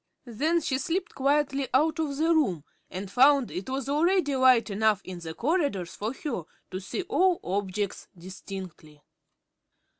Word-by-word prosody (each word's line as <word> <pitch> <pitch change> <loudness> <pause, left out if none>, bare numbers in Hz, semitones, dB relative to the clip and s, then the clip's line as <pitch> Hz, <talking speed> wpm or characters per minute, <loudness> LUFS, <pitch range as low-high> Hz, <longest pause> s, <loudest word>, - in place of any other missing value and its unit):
Then 300 +9 0
she 265 -3 -1
slipped 355 +3 -2
quietly 275 0 +1
out 315 +4 +2
of 290 -3 -2
the 325 +2 +3
room 195 - +1 0.3
and 190 +1 -6
found 270 +1 +4
it 190 +7 -5
was 265 +1 -3
already 305 0 +2
light 255 -4 +4
enough 215 0 +2
in 185 -1 -8
the 160 -1 -7
corridors 275 - -1
for 215 +2 -3
her 270 - -4 0.3
to 185 - -4
see 200 - -4
all 360 +2 +2
objects 195 +1 -3
distinctly. 180 -4 -9
260 Hz, 150 wpm, -27 LUFS, 190-300 Hz, 0.3 s, found